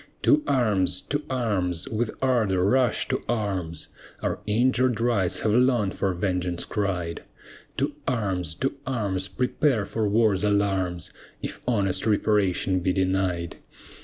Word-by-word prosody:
To 300 -1 +5
arms, 105 -8 +2
to 145 +1 -2
arms, 95 -9 -1
with 110 +1 -1
ardor 110 -8 +2
rush 125 +2 +2
to - - 0
arms, 95 -8 -2 0.3
Our - - -1
injured 125 +2 +2
rights 115 -6 +1
have 110 - +1
long 120 -5 +3
for 100 - -1
vengeance 90 -1 -1
cried. 90 -5 -2 0.6
To 140 +2 0
arms, 95 - -1
to 135 - -1
arms, 100 -7 -1
prepare 125 +1 0
for 110 0 -1
war's 105 -2 +3
alarms, 95 -4 0 0.3
If - - -5
honest 100 -4 +1
reparation 100 -3 +2
be 90 +1 0
denied. 95 -2 0
100 Hz, 130 wpm, -25 LUFS, 95-120 Hz, 0.6 s, To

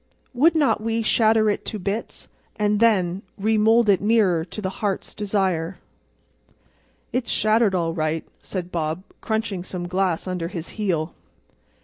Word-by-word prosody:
"'Would 305 +7 +4
not 290 -8 +2
we 225 +1 -1
shatter 220 0 +3
it 205 - 0
to 215 - -4
bits—and 205 +1 -3
then 195 -5 +3 0.2
Remould 220 +2 +3
it 200 -3 +4
nearer 205 -6 +3
to 180 +5 -8
the 190 -2 -4
Heart's 200 -3 -2
Desire!'" 190 -4 -1 1.4
"It's 245 -1 -1
shattered 215 -2 +3
all 165 -2 0
right," 155 -1 -1 0.2
said 180 -2 -5
Bob, 160 +1 -2 0.2
crunching 220 -5 -2
some 180 -1 -5
glass 185 -2 0
under 180 -3 -3
his 170 -2 -6
heel. 175 -7 -2
195 Hz, 135 wpm, -23 LUFS, 175-220 Hz, 1.4 s, Would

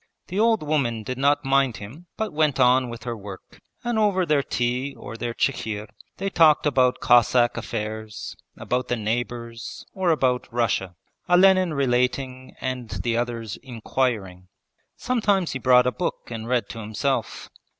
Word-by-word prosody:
The 190 +3 -2
old 225 -4 +3
woman 135 -7 0
did 125 +3 -5
not 145 +1 +2
mind 135 -3 +2
him 125 +12 -11
but 220 -5 -3
went 150 -3 +1
on 125 0 +4
with 120 0 -8
her 120 -1 -3
work, 100 -3 -11 0.2
and 240 -2 0
over 200 -4 +2
their 150 -3 +3
tea 125 +2 -2
or - - -9
their 120 0 -4
chikhir 105 -1 -1 0.3
they 195 - -3
talked 160 -6 +4
about 130 -3 +3
Cossack 120 0 +4
affairs, 110 0 -5 0.2
about 125 0 -2
the 125 - 0
neighbours, 115 +1 -4
or 190 -2 0
about 130 -7 +1
Russia: 110 -6 0 0.3
Olenin 185 -2 +5
relating 130 0 -1
and 125 -3 -4
the 120 -1 0
others 115 -3 -3
inquiring. 115 -7 -2 0.5
Sometimes 205 -8 +1
he 135 - -4
brought 125 0 +5
a 125 - +2
book 175 - -4
and 115 -1 -5
read 125 -1 0
to 115 - -7
himself. 110 +2 -2
125 Hz, 155 wpm, -24 LUFS, 115-150 Hz, 0.5 s, Olenin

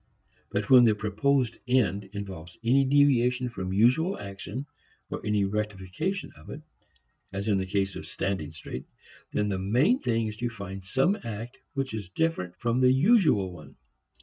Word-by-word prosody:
But 100 0 -2
when 125 -2 +9
the 110 -2 +4
proposed 115 +4 0
end 105 -6 +2
involves 95 -3 -7
any 135 +4 +4
deviation 130 -3 +3
from 95 -5 -5
usual 125 - +3
action, 100 +6 -6 0.5
or - - -4
any 105 -1 +1
rectification 105 - -3
of - - -15
it 150 - -8 0.7
as 100 +2 -4
in 100 -3 +3
the 95 - -3
case 95 -1 0
of - - -7
standing 95 -6 -3
straight 75 -5 -7 0.5
then 105 0 0
the 95 -2 -1
main 125 - +3
thing 115 - 0
is 105 -1 -5
to 120 +1 -1
find 100 -4 -7
some 135 - +2
act 115 +2 -6 0.2
which 135 -3 -2
is 105 -5 -5
different 95 - -1
from 120 +2 +1
the 125 0 +6
usual 145 - +4
one. 75 -5 -13
110 Hz, 165 wpm, -27 LUFS, 95-130 Hz, 0.7 s, when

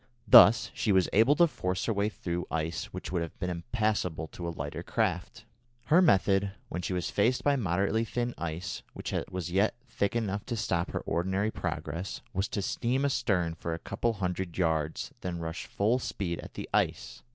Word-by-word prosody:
Thus 110 +2 +8
she 105 - 0
was 95 -2 +4
able 115 +8 +5
to 175 - +6
force 90 - -2
her 115 - +1
way 100 +1 +1
through 90 -4 -4
ice 80 +1 -2
which - - -7
would 90 -2 0
have 85 - -6
been 90 -1 -2
impassable 90 -4 -1
to 85 - -6
a - - -1
lighter 75 -3 -5
craft. - - -2 0.4
Her 170 +4 +5
method, 100 - +3 0.2
when 90 - -3
she 90 +2 -3
was 90 -1 -2
faced 115 +5 +2
by 145 -1 +3
moderately 100 0 +1
thin 120 +1 -2
ice 85 +3 -4
which - - -5 0.2
was 90 -1 -4
yet 100 +5 +2
thick 100 -2 -1
enough 105 -3 -1
to 120 - -2
stop 90 -5 0
her - - -3
ordinary 95 +5 0
progress, 90 -2 -4
was 95 +2 0
to 100 -3 -3
steam 130 +7 0
astern 90 -11 +1
for 85 0 -4
a - - -5
couple 120 - -2
of 115 - -1
hundred 90 -3 -3
yards 80 -3 0
and 90 -1 -3
then - - -5
rush 80 0 -5
full 110 +5 +1
speed 90 -8 -3
at - - -10
the - - -5
ice. - - 0
95 Hz, 195 wpm, -29 LUFS, 85-110 Hz, 0.4 s, Thus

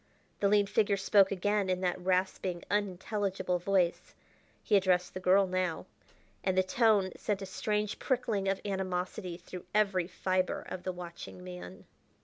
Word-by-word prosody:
The 200 - +3
lean 205 0 +4
figure 200 0 +2
spoke 195 0 +4
again 200 +1 0
in 185 0 0
that 180 0 -1
rasping, 185 -1 0
unintelligible 195 -2 -1
voice 180 -1 0 0.5
he 210 - +2
addressed 180 -2 +2
the 185 - -4
girl 190 +2 +4
now 185 -2 -1 0.6
and 185 -1 0
the 185 - +5
tone 205 -2 +3
sent 205 -2 -2
a - - -4
strange 210 +2 -2
prickling 230 -7 0
of 195 0 +1
animosity 185 -2 -3
through 180 0 -10
every 195 -4 +2
fibre 185 0 -1
of 185 - -5
the 185 - -3
watching 170 - -9
man. 90 0 -9
185 Hz, 150 wpm, -31 LUFS, 180-200 Hz, 0.6 s, the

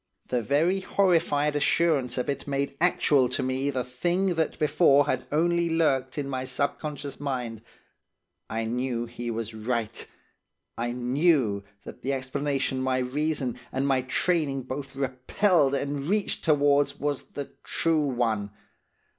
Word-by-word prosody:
The 125 -1 +1
very 160 - +2
horrified 165 -7 +2
assurance 145 -4 +2
of 125 - -1
it 140 - -3
made 140 0 -1
actual 145 -7 +3
to 125 - -2
me 130 +2 0
the 130 -3 -1
thing 175 +10 0
that 160 -2 -1
before 145 -2 +4
had 130 - -2
only 170 +2 +2
lurked 135 -6 +1
in 145 -2 -2
my 130 -2 -3
subconscious 140 +2 -3
mind. 125 -6 -3 0.9
I 115 0 -2
knew 120 0 -1
he 120 0 -6
was 115 -1 -4
right; 115 0 -3 0.7
I 120 +1 -2
knew 125 - +2 0.2
that - - -10
the 135 +2 -1
explanation 135 0 -1
my 130 0 +1
reason 135 0 -1
and 135 +1 -1
my 135 -2 +3
training 140 0 0
both 135 +1 -6
repelled 140 +4 +2
and 140 +2 -2
reached 205 0 0
towards 145 -2 +3
was 145 -1 -1
the 145 -1 -5
true 165 -2 +1
one. 115 -5 0
140 Hz, 140 wpm, -27 LUFS, 125-150 Hz, 0.9 s, before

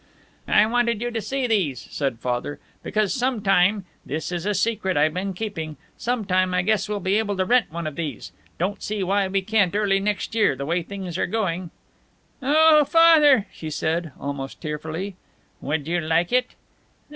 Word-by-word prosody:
"I 210 - +5
wanted 235 -1 +1
you 240 +1 -3
to 225 -1 -2
see 270 +3 -2
these," 185 - 0
said 135 -5 -2
Father, 125 +4 -3 0.2
"because 215 -2 0
some 250 -2 0
time 195 0 +3 0.2
this 155 +5 -4
is 175 +2 -3
a 210 - +1
secret 195 -3 0
I 150 +2 +4
been 185 +4 -4
keeping 165 -7 -5 0.2
some 245 -3 -2
time 185 -1 +1
I 180 - +2
guess 215 0 +1
we'll 210 -1 -2
be 195 +3 +1
able 205 -3 -2
to 185 - +1
rent 245 0 +2
one 170 0 -5
of 155 -2 -4
these! 160 -4 -5 0.3
Don't 190 +4 -2
see 210 -2 -2
why 195 +1 +1
we 195 0 -1
can't 200 -2 +1
early 200 -2 +2
next 205 +1 -2
year, 215 -10 +3
the 140 +1 -5
way 170 +4 0
things 185 -1 -6
are - - +1
going!" 185 -4 -2 0.7
"Oh, 305 +2 +5
Father!" 300 -7 +6
she 160 - -7
said, 160 +1 -2
almost 140 -1 -5
tearfully. 160 +5 -5 0.4
"Would 150 +1 -2
you 175 +1 0
like 165 +6 +1
it?" 250 0 +1
195 Hz, 185 wpm, -23 LUFS, 165-220 Hz, 0.7 s, Father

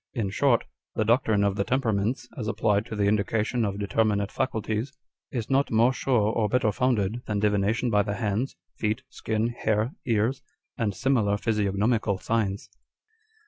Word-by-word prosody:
In 105 -6 -1
short, 125 +2 +3 0.3
the 110 - +1
doctrine 110 -3 +3
of 100 0 +1
the 100 - +2
temperaments, 115 -1 0
as 110 - -4
applied 105 0 +1
to 110 - -5
the 105 - 0
indication 110 +3 +1
of 100 -2 -1
determinate 100 0 0
faculties, 110 -1 -2 0.4
is 115 -4 -3
not 135 +1 +2
more 115 +3 +4
sure 115 -6 +1
or 110 -2 +1
better 125 -1 +2
founded, 120 -1 0
than 105 - -1
divination 105 +3 +1
by 105 -1 +4
the 100 0 -2
hands, 110 +4 -1 0.2
feet, 110 +4 -1
skin, 110 -1 -1
hair, 110 0 0 0.2
ears, 115 +3 +1 0.3
and 105 -4 -1
similar 110 -7 +2
physiognomical 105 0 +1
signs." 100 -2 -1
110 Hz, 155 wpm, -26 LUFS, 105-120 Hz, 0.4 s, more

